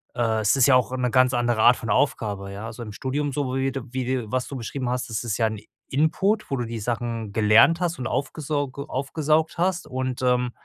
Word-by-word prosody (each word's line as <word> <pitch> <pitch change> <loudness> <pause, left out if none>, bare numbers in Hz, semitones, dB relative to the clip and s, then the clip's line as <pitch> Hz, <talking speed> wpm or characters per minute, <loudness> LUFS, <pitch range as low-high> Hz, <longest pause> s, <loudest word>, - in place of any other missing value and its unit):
äh, 115 -2 +1
es 105 +3 +3
ist 135 -3 +5
ja 140 - +6
auch 125 0 +1
'ne 125 -1 0
ganz 130 0 +4
andere 120 -2 +1
Art 120 - +7
von 115 - -6
Aufgabe. 100 -6 0
Ja. 100 +3 -7
Also 115 +1 -8
im 105 -2 -8
Studium, 140 +5 -2
so 130 -2 -2
wie 135 0 0
de 135 -1 -5
wie 130 -1 -2
dir 125 -4 -2
was 130 -1 -1
du 140 - -7
beschrieben 125 +1 -4
hast, 125 -1 -2
das 110 - -3
ist 115 -4 -2
ja 115 - +2
ein 110 -1 -5 0.3
Input, 190 +9 +1
wo 135 - -1
du 120 - -2
die 115 0 -5
Sachen 115 -1 -3
gelernt 110 +10 +5
hast 175 -1 -1
und 125 - -3
aufgesauge 140 +1 -3
aufgesaugt 155 +4 0
hast 180 +1 0
und, 130 0 -3
ähm, 125 -1 +1
125 Hz, 230 wpm, -24 LUFS, 115-140 Hz, 0.3 s, Art